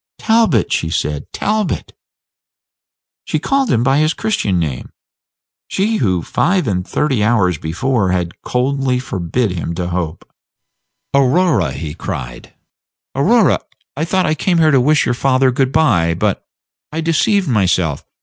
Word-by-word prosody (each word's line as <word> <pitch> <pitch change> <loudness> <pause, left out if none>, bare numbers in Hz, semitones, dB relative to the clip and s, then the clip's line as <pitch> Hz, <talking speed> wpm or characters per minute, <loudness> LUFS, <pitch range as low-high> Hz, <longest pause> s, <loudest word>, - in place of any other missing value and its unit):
"Talbot!" 220 - +2
she 80 - 0
said, 75 -2 -3
"Talbot!" 215 -1 -2 1.3
She - - -2
called 275 -3 0
him 115 -1 +2
by 135 +3 +3
his 155 +1 +1
Christian 105 - -1
name, 75 -7 -3 0.8
she 215 +3 0
who 95 - 0
five 180 -2 0
and 90 -3 -2
thirty 135 -8 0
hours 100 -8 +2
before 95 +6 -1
had 90 -2 -2
coldly 130 0 0
forbidden 95 -2 -2
him 85 +1 -4
to 90 0 -3
hope. 85 -2 -4 0.9
"Aurora," 140 +4 +2
he 75 -3 -5
cried, - - -7 0.6
"Aurora, 215 - +3 0.4
I 150 - -2
thought 185 +2 +1
I 155 - +1
came 175 +2 0
here 160 -2 +4
to 135 -3 +4
wish 150 +4 +3
your 120 - +1
father 130 +2 +2
good 130 +1 0
by; 85 - +2
but - - -1 0.4
I 155 - -4
deceived 170 +4 +1
myself. 90 - +1
125 Hz, 140 wpm, -17 LUFS, -, 1.3 s, here